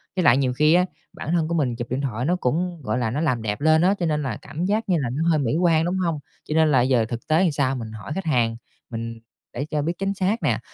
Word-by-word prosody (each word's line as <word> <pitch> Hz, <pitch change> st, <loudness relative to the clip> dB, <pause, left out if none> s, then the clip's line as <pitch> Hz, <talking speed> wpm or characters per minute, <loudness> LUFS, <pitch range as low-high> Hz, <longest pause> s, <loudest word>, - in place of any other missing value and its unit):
Với 185 Hz, -, +1 dB
lại 125 Hz, -, +6 dB
nhiều 130 Hz, -2 st, +1 dB
khi 150 Hz, +4 st, +4 dB
á, 180 Hz, +1 st, +4 dB, 0.3 s
bản 155 Hz, -, -5 dB
thân 170 Hz, -2 st, +1 dB
của 170 Hz, -, -2 dB
mình 135 Hz, -7 st, 0 dB
chụp 120 Hz, 0 st, -6 dB
điện 130 Hz, +2 st, -1 dB
thoại 125 Hz, -3 st, -2 dB
nó 175 Hz, +4 st, +2 dB
cũng, 175 Hz, +3 st, -1 dB
gọi 110 Hz, 0 st, -1 dB
là, 115 Hz, -3 st, -1 dB
nó 145 Hz, +6 st, -1 dB
làm 130 Hz, -8 st, 0 dB
đẹp 105 Hz, +2 st, -3 dB
lên 160 Hz, +1 st, +4 dB
á, 185 Hz, +3 st, +4 dB
cho 175 Hz, -, 0 dB
nên 150 Hz, -2 st, 0 dB
là 125 Hz, -6 st, -3 dB
cảm 165 Hz, +4 st, -4 dB
giác 210 Hz, +2 st, 0 dB
như 180 Hz, -, +3 dB
là 125 Hz, -, -1 dB
nó 155 Hz, +7 st, 0 dB
hơi 160 Hz, -2 st, +3 dB
mỹ 130 Hz, -1 st, 0 dB
quan, 165 Hz, -2 st, +3 dB
đúng 180 Hz, +2 st, -1 dB
hông? 170 Hz, -5 st, -1 dB, 0.2 s
Cho -, -, -4 dB
nên 160 Hz, -1 st, +4 dB
là 130 Hz, -3 st, +4 dB
giờ 125 Hz, -2 st, +2 dB
thực 120 Hz, +1 st, -6 dB
tế 160 Hz, +2 st, +3 dB
làm 175 Hz, -, +3 dB
sao 135 Hz, -2 st, 0 dB
mình 115 Hz, -4 st, -6 dB
hỏi 110 Hz, +5 st, -8 dB
khách 195 Hz, -, -4 dB
hàng 120 Hz, -7 st, +1 dB, 0.3 s
mình 115 Hz, -1 st, -5 dB, 0.3 s
để 140 Hz, -, -3 dB
cho 150 Hz, -1 st, -2 dB
biết 165 Hz, +4 st, -1 dB
chính 195 Hz, 0 st, -1 dB
xác 200 Hz, +4 st, -1 dB
nè, -, -, +1 dB
150 Hz, 295 wpm, -23 LUFS, 125-170 Hz, 0.3 s, lại